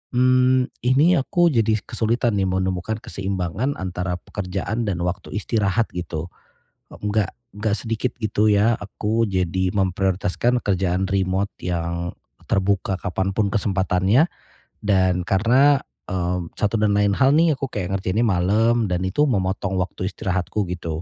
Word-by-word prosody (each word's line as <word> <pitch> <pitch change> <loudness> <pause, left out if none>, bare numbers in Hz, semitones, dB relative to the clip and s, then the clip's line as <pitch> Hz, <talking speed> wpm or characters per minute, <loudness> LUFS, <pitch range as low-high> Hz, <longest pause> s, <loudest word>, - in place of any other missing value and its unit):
mmm, 130 0 +4 0.2
ini 140 +8 +4
aku 175 +5 +2
jadi 110 -2 +2
kesulitan 115 0 0
nih 95 -1 +1
menemukan 95 +3 -1
keseimbangan 95 - -3
antara 90 -1 -3
pekerjaan 100 +5 -4
dan 95 -4 -1
waktu 90 +2 -4
istirahat, 105 +1 0
gitu. 85 -2 -4 0.7
E - - -9
enggak 105 -2 0 0.2
enggak 105 -1 0
sedikit, 115 +2 -2
gitu 110 0 +1
ya, 105 +3 +4
aku 105 +2 -1
jadi 95 -2 0
memprioritaskan 95 +5 +1
kerjaan 95 -1 0
remote 95 0 0
yang 85 0 -2 0.4
terbuka 95 0 +1
kapanpun 95 +2 -1
kesempatannya. 100 - +2 0.6
Dan 95 -3 +2
karena, 130 +9 +4 0.3
eee, 90 -1 -1 0.2
satu 105 +1 +1
dan 105 -1 +3
lain 100 -1 +3
hal 130 +1 +4
nih 160 -2 +3
aku 135 - -3
kayak 95 -1 -2
ngerjainnya 95 +4 0
malem 110 +5 +2
dan 90 0 0
itu 145 +11 +2
memotong 95 -5 -1
waktu 90 0 -3
istirahatku, 95 +2 -2
gitu. 85 -2 -4
100 Hz, 135 wpm, -22 LUFS, 95-115 Hz, 0.7 s, mmm